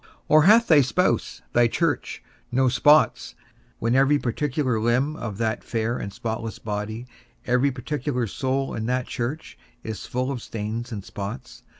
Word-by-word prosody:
or 155 Hz, 0 st, +6 dB
hath 225 Hz, +4 st, +7 dB
thy 155 Hz, -7 st, +6 dB
spouse, 180 Hz, +8 st, 0 dB
thy 120 Hz, 0 st, +5 dB
church, 160 Hz, +5 st, -1 dB, 0.3 s
no 130 Hz, +1 st, +3 dB
spots, 150 Hz, +5 st, +3 dB, 0.4 s
when 115 Hz, +1 st, 0 dB
every 135 Hz, +3 st, +4 dB
particular 130 Hz, -1 st, -1 dB
limb 125 Hz, +7 st, +1 dB
of 110 Hz, -9 st, -5 dB
that 110 Hz, -1 st, -1 dB
fair 115 Hz, 0 st, -1 dB
and 100 Hz, -, -5 dB
spotless 110 Hz, +2 st, -4 dB
body, 110 Hz, +2 st, -4 dB, 0.4 s
every 125 Hz, +3 st, +3 dB
particular 125 Hz, -1 st, -2 dB
soul 130 Hz, +5 st, -2 dB
in 110 Hz, 0 st, -3 dB
that 125 Hz, 0 st, 0 dB
church, 130 Hz, +7 st, -5 dB, 0.2 s
is 110 Hz, -4 st, -6 dB
full 125 Hz, +2 st, -2 dB
of 125 Hz, -4 st, -4 dB
stains 115 Hz, +3 st, -5 dB
and 100 Hz, -3 st, -6 dB
spots? 100 Hz, -12 st, -7 dB
125 Hz, 155 wpm, -24 LUFS, 110-140 Hz, 0.4 s, hath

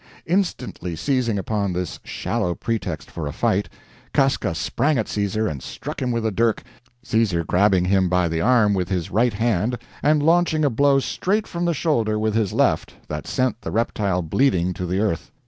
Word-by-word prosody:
Instantly 125 Hz, -, -1 dB
seizing 125 Hz, -, 0 dB
upon 100 Hz, -1 st, -1 dB
this 90 Hz, -1 st, -4 dB
shallow 90 Hz, -1 st, -2 dB
pretext 115 Hz, -1 st, -3 dB
for 80 Hz, -3 st, -4 dB
a -, -, -3 dB
fight, 95 Hz, +5 st, 0 dB, 0.5 s
Casca 135 Hz, -, +2 dB
sprang 140 Hz, -, 0 dB
at 110 Hz, -, -1 dB
Caesar 105 Hz, +1 st, -1 dB
and 70 Hz, -8 st, -4 dB
struck -, -, -7 dB
him 125 Hz, -2 st, 0 dB
with 115 Hz, -1 st, -1 dB
a 110 Hz, -, +1 dB
dirk, 115 Hz, +2 st, +1 dB, 0.4 s
Caesar 110 Hz, -8 st, +1 dB
grabbing 95 Hz, +1 st, +3 dB
him 95 Hz, -1 st, +2 dB
by 90 Hz, -1 st, +2 dB
the 80 Hz, 0 st, -1 dB
arm 115 Hz, -3 st, +4 dB
with 90 Hz, -3 st, -1 dB
his 90 Hz, -4 st, -2 dB
right 115 Hz, +3 st, +2 dB
hand, 110 Hz, +2 st, 0 dB, 0.2 s
and 150 Hz, 0 st, +3 dB
launching 165 Hz, -1 st, +3 dB
a 140 Hz, -, +2 dB
blow 140 Hz, +4 st, +4 dB
straight 200 Hz, +9 st, 0 dB
from 170 Hz, 0 st, -3 dB
the 170 Hz, -1 st, +1 dB
shoulder 115 Hz, -9 st, +1 dB
with 110 Hz, 0 st, 0 dB
his 110 Hz, -3 st, +1 dB
left, -, -, +1 dB
that -, -, -5 dB
sent 130 Hz, -3 st, 0 dB
the -, -, -5 dB
reptile 100 Hz, -2 st, 0 dB
bleeding 90 Hz, -, +1 dB
to 90 Hz, +1 st, -4 dB
the 90 Hz, +2 st, -1 dB
earth. 100 Hz, -6 st, -1 dB
110 Hz, 185 wpm, -22 LUFS, 90-130 Hz, 0.5 s, arm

